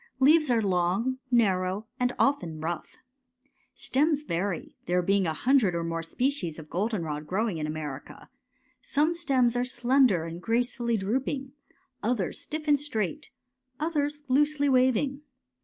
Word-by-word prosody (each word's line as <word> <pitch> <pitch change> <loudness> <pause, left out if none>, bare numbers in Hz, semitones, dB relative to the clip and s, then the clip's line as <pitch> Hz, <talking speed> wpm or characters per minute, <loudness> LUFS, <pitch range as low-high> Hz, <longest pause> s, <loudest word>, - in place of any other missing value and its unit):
Leaves 305 +2 +5
are 230 -3 +3
long, 195 +7 0
narrow, 195 -4 +2
and 250 0 +2
often 175 - +1
rough. 165 +2 -5 0.8
Stems 295 +2 +1
vary, 180 - -3
there 180 +1 +1
being 195 0 +2
a 160 - 0
hundred 220 - +3
or 170 - -1
more 165 0 -2
species 180 - -1
of 155 -2 -11
goldenrod 170 -7 -2
growing 195 0 -1
in 155 - -2
America 150 -3 -7 0.5
some 300 +4 +1
stems 265 -8 +1
are 245 - +1
slender 250 -6 +3
and 165 +1 -7
gracefully 235 +2 0
droop 220 +7 -1
ing—others 260 -6 -4
stiff 310 0 -5
and 290 -1 +4
straight— 285 - -3 0.5
others 295 -2 -1
loosely 285 +2 +2
waving. 260 +1 +2
235 Hz, 135 wpm, -27 LUFS, 180-275 Hz, 0.8 s, Leaves